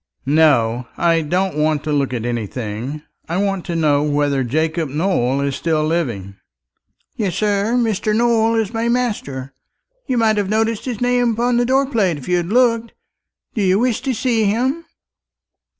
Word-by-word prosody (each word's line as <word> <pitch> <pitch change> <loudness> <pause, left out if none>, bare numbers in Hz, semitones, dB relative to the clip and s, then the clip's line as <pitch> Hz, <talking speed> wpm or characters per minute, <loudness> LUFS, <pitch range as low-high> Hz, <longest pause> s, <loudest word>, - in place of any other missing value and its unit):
"No, 130 -6 +3
I 165 -1 +2
don't 180 +3 -1
want 150 -1 +1
to 155 - -3
look 140 -3 0
at 120 -2 -3
anything. 120 +4 -4 0.3
I 170 - -1
want 195 -2 -1
to 170 - -3
know 150 -3 +2
whether 145 -2 +1
Jacob 160 +4 -1
Nowell 140 -4 0
is 140 -1 -1
still 155 -2 0
living?" 115 - -2 0.8
"Yes, 195 -6 -1
sir. 210 +2 +1
Mr. 215 -2 0
Nowell 230 -1 +2
is 225 -1 -1
my 230 +1 -1
master. 175 - -2 0.5
You 255 -3 0
might 220 -2 +3
have 200 -2 0
noticed 220 0 0
his 245 -4 -4
name 245 -1 +2
upon 240 +2 +1
the 240 0 +1
door 270 +2 +3
plate 210 - 0
if 135 - -10
you 180 - +2
had 175 -1 -2
looked! 230 +1 +2 0.6
Do 220 - -2
you 190 -1 +3
wish 240 0 0
to 265 -2 -2
see 225 -2 +1
him?" 260 +11 0
185 Hz, 170 wpm, -19 LUFS, 145-230 Hz, 0.8 s, No